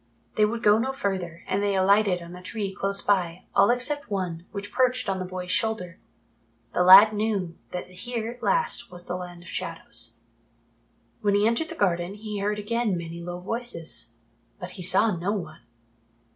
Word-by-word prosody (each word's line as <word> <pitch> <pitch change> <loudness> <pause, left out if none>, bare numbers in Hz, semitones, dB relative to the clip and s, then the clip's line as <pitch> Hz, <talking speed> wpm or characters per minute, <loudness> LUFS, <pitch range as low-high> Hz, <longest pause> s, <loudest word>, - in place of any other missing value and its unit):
They 215 - +4
would 230 +2 -3
go 210 +1 +5
no 260 +3 -1
further 185 -8 -3
and 195 - 0
they 200 -1 +1
alighted 190 -1 +3
on 170 +1 -10
a 180 - -10
tree 195 +1 -4
close 200 +1 0
by, 180 -3 0
all - - +5
except 255 +3 0
one, 180 -4 -3
which 200 -1 -6
perched 255 0 +1
on 190 -1 -1
the 185 - -3
boy's 180 0 -5
shoulder. 185 -2 -1 0.7
The - - +1
lad 195 +4 +9
knew 205 -5 -1
that 180 - -5
here 225 +5 -4
at 245 - -14
last 470 - +1
was 175 0 -9
the 180 - -3
Land 175 -1 -8
of - - -12
Shadows. 115 -8 -3 1.0
When 205 -1 +2
he 205 +1 +3
entered 235 +8 +1
the 335 - -6
garden 180 - 0
he 210 -1 -5
heard 210 +1 -1
again 215 -2 -1
many 170 0 -7
low 175 +1 -6
voices. 170 - 0 0.4
But 180 0 -7
he 185 - -9
saw 195 +3 +3
no 180 +5 -1
one. 165 -6 -6
195 Hz, 185 wpm, -26 LUFS, 180-220 Hz, 1.0 s, lad